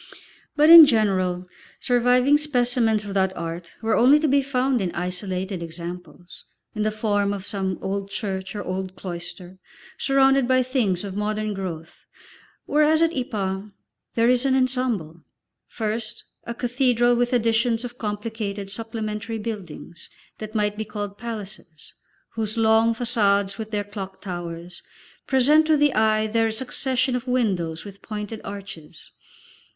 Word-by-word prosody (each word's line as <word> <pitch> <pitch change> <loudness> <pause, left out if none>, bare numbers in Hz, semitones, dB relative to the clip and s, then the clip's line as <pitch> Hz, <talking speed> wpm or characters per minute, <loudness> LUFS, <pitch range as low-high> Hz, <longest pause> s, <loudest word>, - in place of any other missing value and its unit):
But 305 +2 +6
in 330 -3 +12
general, 190 -7 +1 0.3
surviving 250 +3 +3
specimens 245 -6 +1
of 200 - -5
that 190 -1 0
Art 170 +1 -6
were 225 - +2
only 265 +5 +6
to 315 - +2
be 280 0 +3
found 260 -2 0
in 180 -2 -1
isolated 180 +1 -3
examples, 175 +2 -9 0.3
in 215 - -3
the 215 - +2
form 205 -2 0
of 195 -1 -5
some 190 -3 -2
old 195 +1 -3
church 195 -1 -4
or 205 - -4
old 185 0 -4
cloister, 175 0 -7 0.4
surrounded 270 -1 +3
by 255 0 +3
things 230 -9 0
of 195 -2 -6
modern 215 +1 -2
growth, 170 -4 -7 0.6
whereas 305 +2 +3
at 330 0 +1
Ypres, 205 -6 -3 0.4
there 230 0 +3
is 250 0 +3
an 270 -1 +2
ensemble; 250 -11 -1 0.5
first 220 0 -4 0.2
a 235 - -5
cathedral 245 -1 +2
with 245 +1 +1
additions 230 0 +1
of 240 0 -9
complicated 210 -2 -4
supplementary 225 0 -5
buildings, 195 -6 -7 0.3
that 215 +1 -8
might 210 -1 0
be - - -1
called 205 -1 -6
palaces, 205 -8 -8 0.4
whose 220 -1 -3
long 225 +1 +4
façades 200 -5 +1
with 220 -1 -5
their 210 -2 -2
clock 200 -2 -8
towers 175 -2 -7 0.5
present 295 +4 +4
to 310 -1 +4
the 290 -1 +3
eye 215 0 +2
their 225 +1 +1
succession 255 +2 -1
of 250 +1 -4
windows 190 -10 -1
with 200 -1 -11
pointed 210 0 -6
arches. 195 -6 -10
215 Hz, 145 wpm, -23 LUFS, 190-245 Hz, 0.6 s, in